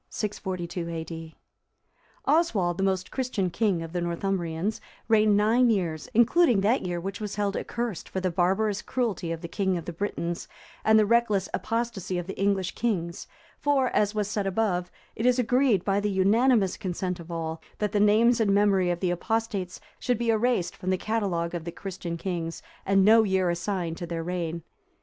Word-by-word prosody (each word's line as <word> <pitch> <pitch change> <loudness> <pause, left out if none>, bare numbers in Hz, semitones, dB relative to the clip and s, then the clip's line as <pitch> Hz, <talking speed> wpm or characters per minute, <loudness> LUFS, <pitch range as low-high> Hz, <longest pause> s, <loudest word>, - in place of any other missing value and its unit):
[642 185 -4 -4
A.D.] 165 -1 -6 0.9
Oswald, 220 - +2
the - - +1
most 190 -1 0
Christian 235 -9 -1
king 190 -5 +1
of 165 0 -8
the 175 - -1
Northumbrians, 175 +2 -2 0.3
reigned 215 -2 +4
nine 230 +4 +4
years, 180 -3 -1
including 240 - +4
that 225 +7 +2
year 175 -1 -3
which 195 +4 -5
was 210 -1 -4
held 205 -1 -1
accursed 235 -7 -4
for 190 - -3
the 185 -1 -1
barbarous 195 +4 +1
cruelty 215 -9 -2
of 165 -1 -4
the 170 - -5
king 190 +1 0
of 170 - -6
the 175 - -5
Britons 170 -2 -3 0.4
and 220 0 +5
the 215 - +5
reckless 210 -4 +2
apostacy 230 -6 -2
of 175 - -3
the 195 - -6
English 195 -2 0
kings; 175 -8 -2 0.3
for, 280 -3 +2
as 210 0 +1
was 210 -2 0
said 205 -1 -2
above,(339) 185 -3 0 0.3
it 225 - -1
is 250 0 +4
agreed 250 -5 +2
by 200 0 +2
the 205 0 0
unanimous 205 +1 +3
consent 180 0 -3
of 170 0 -10
all, 165 -1 -4 0.2
that 210 -2 -1
the 210 - +1
names 220 +4 +4
and 215 -3 +3
memory 195 -2 +3
of 175 -1 -1
the 180 -2 +1
apostates 205 0 -2 0.2
should 245 -2 0
be 235 0 +1
erased 220 -6 +1
from 185 - -5
the 185 - +2
catalogue 185 -6 -1
of 170 -2 -3
the 170 - -5
Christian 175 -2 -6
kings, 170 -2 -4 0.2
and 195 0 +4
no 225 +2 +7
year 190 -4 +1
assigned 170 -1 -2
to 175 - -5
their 165 -1 -3
reign. 170 -1 -3
195 Hz, 185 wpm, -27 LUFS, 175-220 Hz, 0.9 s, no